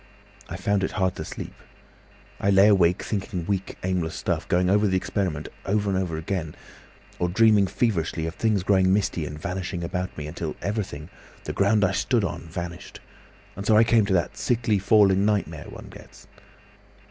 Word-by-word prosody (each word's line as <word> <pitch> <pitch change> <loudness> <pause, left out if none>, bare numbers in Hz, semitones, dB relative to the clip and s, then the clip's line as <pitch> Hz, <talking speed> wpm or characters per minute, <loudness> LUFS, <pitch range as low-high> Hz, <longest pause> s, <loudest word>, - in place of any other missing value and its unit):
I - - -5
found 100 -1 0
it - - -2
hard 95 -2 +1
to - - -4
sleep. - - -7 0.9
I 100 - +1
lay 100 +1 +6
awake 90 -4 +3
thinking 95 -4 -3
weak 100 -1 -3
aimless 90 -4 -1
stuff, - - -2
going 90 +1 +2
over 105 +3 +3
the 95 -1 +2
experiment 90 -5 -2 0.2
over 100 0 0
and 95 - +1
over 85 -4 -2
again, 80 -2 -4 0.6
or 90 - +1
dreaming 105 0 +4
feverishly 85 -7 -1
of 80 - -4
things 105 -3 0
growing 95 -1 +3
misty 95 -5 0
and 75 +1 -7
vanishing 90 0 -4
about 90 +2 -4
me, 75 - -5
until 80 +1 -5
everything, 95 -7 -4 0.3
the - - -4
ground 100 +1 +3
I 95 - +1
stood 115 +3 +1
on, 95 - -2
vanished, 85 +2 -7 0.6
and 100 - -6
so 110 +1 +4
I 110 - +7
came 115 -2 +3
to 100 - +1
that 85 -2 0
sickly 115 -4 +1
falling 100 -1 +4
nightmare 100 -7 -1
one - - -10
gets. - - -14
95 Hz, 180 wpm, -25 LUFS, 85-105 Hz, 0.9 s, I